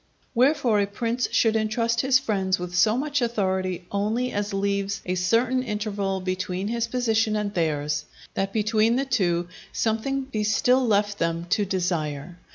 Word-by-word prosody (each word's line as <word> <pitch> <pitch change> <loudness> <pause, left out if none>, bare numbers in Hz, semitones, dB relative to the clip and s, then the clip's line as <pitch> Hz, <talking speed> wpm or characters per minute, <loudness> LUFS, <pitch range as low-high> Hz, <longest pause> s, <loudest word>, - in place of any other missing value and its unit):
Wherefore, 255 -3 +3
a 200 - 0
prince 230 +4 -1
should 225 -1 +3
entrust 230 +1 +1
his 265 -1 +4
friends 195 -7 0
with 180 0 -6
so 215 +6 +3
much 290 0 -1
authority 190 -6 -1
only 220 +5 0
as 205 +1 -2
leaves 200 0 -1
a 180 - -1
certain 230 +8 +2
interval 205 -4 -2
between 185 +1 -2
his 235 0 -1
position 225 -3 +1
and 210 -1 -2
theirs; 150 -3 -1 0.3
that 195 0 -1
between 215 +2 +2
the 270 +2 0
two 175 -9 +1 0.2
something 235 +5 -1
be 225 -5 -3
still 250 +4 +3
left 205 -1 +1
them 165 0 -1
to 205 +4 +2
desire. 175 -3 -2
210 Hz, 160 wpm, -25 LUFS, 185-235 Hz, 0.3 s, his